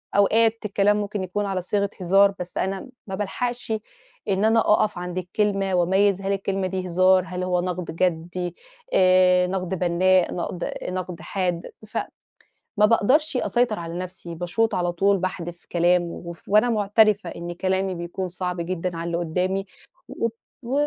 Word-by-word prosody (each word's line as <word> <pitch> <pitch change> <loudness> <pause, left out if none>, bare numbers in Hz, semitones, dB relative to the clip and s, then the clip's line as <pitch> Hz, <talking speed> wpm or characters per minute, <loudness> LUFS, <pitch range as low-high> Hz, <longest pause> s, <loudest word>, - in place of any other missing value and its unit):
أوقات 220 +3 +4
الكلام 205 0 +2
ممكن 205 -1 -3
يكون 205 +3 -2
على 190 -2 -2
صيغة 200 +2 0
هزار، 195 +3 +5
بس 180 0 -5
أنا 190 0 -1
م 260 - -12 0.2
ما 190 - -4
بالحقشِ 240 +4 -3 0.6
إن 195 +2 +2
أنا 225 +1 +4
أقف 210 -2 +2
عند 180 0 -5
الكلمة 195 +1 0
وأميّز 190 +2 +3
هل 195 +1 0
الكلمة 195 -1 -1
دي 185 0 -3
هزار، 185 +1 +4
هل 180 +1 -4
هو 180 -1 +1
نقد 180 -2 -4
جَدّي 175 0 -1 0.4
آآ، 185 0 +5
نقد 185 0 -2
بنّاء 180 +1 +3
نقد، 175 0 -3
نقد 180 -1 -4
حاد 180 -3 -2 0.2
ف 215 - -6 0.8
ما 210 - +6
باقدرش 255 +7 +3
أسيطر 240 -4 +1
على 165 0 -6
نَفْسي، 180 -2 -7
باشوط 180 +7 0
على 175 -1 0
طول، 195 +3 +2
باحدف 175 -2 -5
كلام، 175 +1 +3
وف 170 -1 -9
وأنا 215 +4 +4
معترفة 215 -1 +3
إن 170 +1 -6
كلامي 190 +1 -1
بيكون 175 +2 -4
صعب 180 0 -3
جدًا 175 0 -3
على 165 +1 -4
اللي 170 0 -1
قُدّامي، 180 +3 -1 0.4
والط 230 0 -3 0.3
و 240 +3 -4
185 Hz, 160 wpm, -24 LUFS, 175-200 Hz, 0.8 s, ما